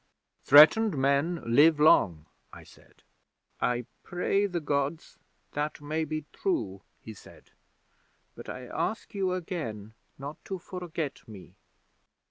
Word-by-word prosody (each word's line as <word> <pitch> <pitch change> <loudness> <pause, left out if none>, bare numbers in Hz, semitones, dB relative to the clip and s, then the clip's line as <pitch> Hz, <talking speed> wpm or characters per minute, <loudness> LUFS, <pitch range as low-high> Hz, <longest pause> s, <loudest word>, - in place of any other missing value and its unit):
'"Threatened 155 +7 +7
men 140 +5 +1
live 145 +7 +5
long," 85 - +4 0.3
I - - -12
said. - - -21 0.6
'"I 125 -1 0 0.2
pray 195 +3 0
the 180 -3 -3
Gods 145 +1 -3 0.3
that 150 +1 -3
may 155 +2 -2
be 155 0 -4
true," 100 - -2 0.2
he 110 - -10
said. 100 - -17 0.8
"But - - -11
I 125 - -7
ask 220 - -4
you 190 -2 -1
again 115 - -5 0.2
not 140 +3 -9
to 190 - -4
forget 175 -5 -6
me." 100 -4 -12
150 Hz, 120 wpm, -28 LUFS, 125-175 Hz, 0.8 s, Threatened